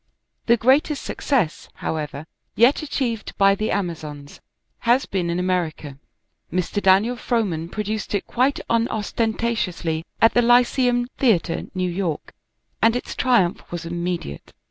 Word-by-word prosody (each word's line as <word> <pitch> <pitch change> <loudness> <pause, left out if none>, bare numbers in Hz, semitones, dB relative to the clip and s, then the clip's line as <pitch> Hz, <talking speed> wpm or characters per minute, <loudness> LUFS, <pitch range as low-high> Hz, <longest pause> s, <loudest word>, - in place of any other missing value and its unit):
The 235 0 +5
greatest 270 +5 +2
success, 235 - -1
however, 150 -1 -4 0.3
yet 240 +6 +4
achieved 255 -7 -3
by 195 0 +5
"The 215 +2 -2
Amazons," 155 -7 -4 0.4
has 245 +3 +2
been 180 -3 -2
in 170 - -1
America. 170 -6 -2 0.5
Mr. 185 +4 -1
Daniel 200 +6 +4
Frohman 200 -10 -1
produced 210 +1 -3
it 200 - -2
quite 260 +3 +1
unostentatiously 220 -7 -1 0.2
at 225 - +5
the 245 - +4
Lyceum 245 0 +3
Theatre, 200 -10 +2
New 185 0 0
York, 175 -4 -3 0.5
and 225 +1 +4
its 245 - -4
triumph 235 -9 +2
was 175 -1 -5
immediate. 170 - -4
205 Hz, 125 wpm, -22 LUFS, 170-240 Hz, 0.5 s, The